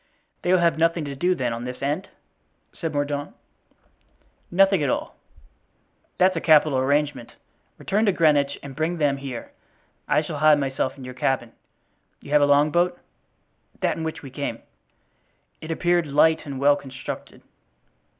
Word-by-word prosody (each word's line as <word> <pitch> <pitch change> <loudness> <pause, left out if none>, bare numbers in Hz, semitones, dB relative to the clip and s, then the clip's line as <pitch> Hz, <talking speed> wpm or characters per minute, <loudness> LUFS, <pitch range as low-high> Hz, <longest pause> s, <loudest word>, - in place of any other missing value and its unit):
"They 175 - 0
will 185 -1 +4
have 165 -2 +2
nothing 165 -1 +1
to 140 -1 -6
do, 180 +6 +1
then 125 -5 -2
at 115 +1 -5
this 125 0 -6
end?" 150 +8 -2 0.6
said 165 -3 -4
Mordaunt. 145 0 -3 1.1
"Nothing 195 0 +4
at 145 - +1
all." - - -3 1.0
"That's 185 0 +3
a 165 - -2
capital 155 -4 +4
arrangement. 145 -2 -1 0.4
Return 210 +3 0
to - - +5
Greenwich 145 -5 +2
and 140 -2 -9
bring 160 +3 -1
them 145 -3 +1
here. 135 -3 -7 0.6
I 150 - +2
shall 150 -1 -5
hide 155 -1 +5
myself 135 -1 -2
in 130 - -9
your 125 - -7
cabin. 130 -2 -1 0.7
You 140 - -12
have 150 0 +5
a 145 - +4
longboat?" 155 +5 +2 0.8
"That - - +1
in 165 - -5
which 160 -2 -5
we 135 - -9
came." 130 -4 -5 1.0
"It 155 - -8
appeared 175 0 +1
light 155 +2 +3
and 135 -2 -5
well 145 +1 +5
constructed." 135 -2 -8
145 Hz, 160 wpm, -24 LUFS, 140-165 Hz, 1.1 s, to